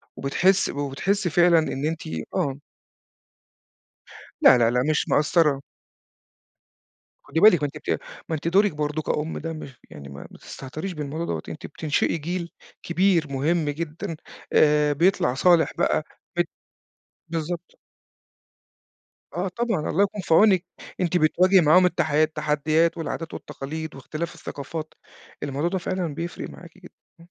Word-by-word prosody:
وبتحسّ 185 Hz, +8 st, +2 dB
وبتحسّي 145 Hz, +7 st, -1 dB
فعلًا 175 Hz, 0 st, +5 dB
إن 145 Hz, -2 st, -2 dB
أنتِ 160 Hz, 0 st, -2 dB, 0.3 s
آه. 140 Hz, 0 st, -1 dB, 1.8 s
لا، 130 Hz, -, +8 dB
لا، 115 Hz, -1 st, +3 dB
لا 125 Hz, +1 st, +1 dB
مش 155 Hz, -, +1 dB
مقَصّرة. 150 Hz, -2 st, +3 dB, 1.6 s
خُدي 160 Hz, -, -2 dB
بالِك 180 Hz, -6 st, +7 dB
ما -, -, +3 dB
أنتِ -, -, -5 dB
بت -, -, -10 dB, 0.4 s
ما 160 Hz, -, 0 dB
أنتِ 155 Hz, -, -4 dB
دورِك 200 Hz, +3 st, +4 dB
برضه 150 Hz, +1 st, -2 dB
كأُم 155 Hz, +1 st, -2 dB
ده 165 Hz, +1 st, -4 dB
مش 135 Hz, -5 st, -9 dB
يعني 70 Hz, -1 st, -10 dB
ما 70 Hz, -, -10 dB
ما -, -, -13 dB
تستهتريش 155 Hz, +8 st, -7 dB
بالموضوع 150 Hz, +2 st, -4 dB
دوّة، -, -, -3 dB
أنتِ 155 Hz, -, -8 dB
بتنشئي 155 Hz, +2 st, -1 dB
جيل 170 Hz, +2 st, -4 dB, 0.3 s
كبير 175 Hz, -2 st, +2 dB
مهم 150 Hz, +3 st, 0 dB
جدًا 160 Hz, +2 st, -4 dB, 0.4 s
آآ 150 Hz, -1 st, +4 dB
بيطلع 165 Hz, -5 st, +2 dB
صالح 170 Hz, +4 st, +4 dB
بقى، -, -, +1 dB, 0.3 s
بت -, -, +1 dB, 0.8 s
بالضبط. 170 Hz, +1 st, -5 dB, 1.6 s
آه 180 Hz, +3 st, -2 dB
طبعًا، 215 Hz, -4 st, -2 dB
الله 195 Hz, -, +3 dB
يكون 205 Hz, 0 st, -2 dB
في 165 Hz, -, 0 dB
عونِك. 190 Hz, -1 st, +5 dB, 0.4 s
أنتِ 180 Hz, 0 st, +2 dB
بتواجهي 180 Hz, +4 st, +4 dB
معاهم 180 Hz, +4 st, +6 dB
التحي 155 Hz, -3 st, +2 dB
التحديات 155 Hz, +2 st, +1 dB
والعادات 165 Hz, 0 st, -4 dB
والتقاليد 160 Hz, +3 st, -6 dB
واختلاف 155 Hz, +5 st, -5 dB
الثقافات، 155 Hz, +3 st, -7 dB, 0.5 s
الموضوع 145 Hz, +4 st, -1 dB
ده 190 Hz, -, -1 dB
فعلًا 175 Hz, -3 st, -3 dB
بيفرق 170 Hz, +4 st, -5 dB
معاكِ 175 Hz, -1 st, -12 dB
جدًا. 180 Hz, -1 st, -14 dB, 0.3 s
إمم. -, -, -16 dB
160 Hz, 140 wpm, -24 LUFS, 150-175 Hz, 1.8 s, لا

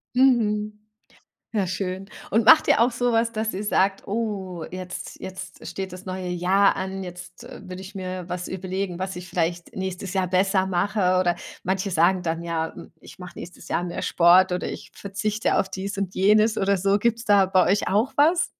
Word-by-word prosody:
Mhm. 215 Hz, -5 st, +2 dB, 0.7 s
Ja, 200 Hz, -3 st, +1 dB
schön. 185 Hz, +1 st, -4 dB, 0.2 s
Und 225 Hz, 0 st, +2 dB
macht 315 Hz, +5 st, +8 dB
ihr -, -, +4 dB
auch 245 Hz, +1 st, +4 dB
so 245 Hz, +1 st, 0 dB
was, 230 Hz, 0 st, +2 dB
dass 220 Hz, 0 st, -2 dB
ihr 195 Hz, +3 st, -4 dB
sagt: 195 Hz, -1 st, +1 dB
„Oh, 195 Hz, -6 st, -3 dB
jetzt 185 Hz, 0 st, -7 dB
jetzt 185 Hz, 0 st, -9 dB
steht 190 Hz, -1 st, -5 dB
das 185 Hz, +1 st, -10 dB
neue 185 Hz, -1 st, -4 dB
Jahr 185 Hz, +3 st, +3 dB
an, 190 Hz, 0 st, -4 dB
jetzt, 180 Hz, +3 st, -10 dB
äh, 250 Hz, -, -10 dB
würde 185 Hz, +1 st, -7 dB
ich 195 Hz, +2 st, -11 dB
mir 185 Hz, -1 st, -5 dB
was 180 Hz, 0 st, -4 dB
überlegen, 185 Hz, -1 st, -4 dB
was 190 Hz, 0 st, -3 dB
ich 180 Hz, +1 st, -8 dB
vielleicht 170 Hz, 0 st, -2 dB
nächstes 190 Hz, 0 st, -4 dB
Jahr 190 Hz, -1 st, +1 dB
besser 190 Hz, +1 st, +2 dB
mache?" 185 Hz, 0 st, +1 dB
Oder 175 Hz, -2 st, +2 dB, 0.3 s
manche 190 Hz, +2 st, -1 dB
sagen 175 Hz, +2 st, +3 dB
dann 165 Hz, 0 st, -2 dB
ja: 165 Hz, -1 st, -2 dB, 0.3 s
„Ich -, -, -14 dB
mach 180 Hz, 0 st, -9 dB
nächstes 175 Hz, +1 st, -10 dB
Jahr 175 Hz, -, -1 dB
mehr 175 Hz, -, -4 dB
Sport" 180 Hz, +2 st, +5 dB
oder: 180 Hz, -, -2 dB
„Ich -, -, -8 dB
verzichte 210 Hz, +2 st, -2 dB
auf 195 Hz, -, 0 dB
dies 195 Hz, +1 st, -5 dB
und 195 Hz, -2 st, -2 dB
jenes" 215 Hz, +3 st, +4 dB
oder 200 Hz, 0 st, +2 dB
so. 195 Hz, +2 st, +2 dB
Gibt's 230 Hz, +1 st, 0 dB
da 200 Hz, -2 st, +5 dB
bei 185 Hz, -1 st, +3 dB
euch 200 Hz, -, +2 dB
auch 215 Hz, +7 st, +1 dB
was? 335 Hz, +5 st, +4 dB
190 Hz, 195 wpm, -24 LUFS, 180-210 Hz, 0.7 s, macht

